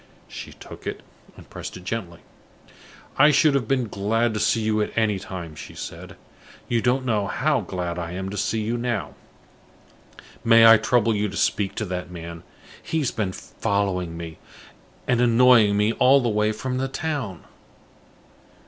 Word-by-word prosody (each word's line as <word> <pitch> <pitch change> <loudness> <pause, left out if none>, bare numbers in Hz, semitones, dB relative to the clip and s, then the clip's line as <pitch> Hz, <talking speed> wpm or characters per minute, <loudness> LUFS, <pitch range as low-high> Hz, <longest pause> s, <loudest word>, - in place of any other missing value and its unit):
She - - -9
took - - -11
it, - - -4 0.4
and - - -14
pressed - - -8
it 90 - -12
gently. 95 -4 -5 1.0
"I 150 +2 +8
should 150 0 +4
have 135 -5 0
been 130 -2 +1
glad 110 +3 0
to 105 - -2
see 115 - +2
you 110 0 +1
at 105 - -2
any 105 -3 +2
time," 90 -4 -7
she - - -10
said. - - -8 0.5
"You 115 -1 +1
don't 130 +2 +1
know 105 -5 0
how 140 +3 +1
glad 90 -2 -4
I 85 0 -5
am 95 +1 -4
to - - -5
see 110 +2 -1
you 115 +3 -2
now. 120 -5 -2 1.3
May 115 0 +7
I 115 0 +9
trouble 115 +1 +2
you 105 0 0
to 95 - -7
speak 100 -2 0
to 110 - -2
that 90 -2 -5
man? 85 -1 -8 0.4
He 160 - -3
has 145 -6 0
been 100 -4 -2
following 90 -4 -2
me, 80 -1 -8 0.7
and 125 -1 +2
annoying 120 -3 +5
me 105 +2 +2
all 135 +4 +5
the 120 -3 0
way 105 0 +1
from 125 +4 -3
the 135 - -1
town." 135 - -4
110 Hz, 175 wpm, -24 LUFS, 95-120 Hz, 1.3 s, I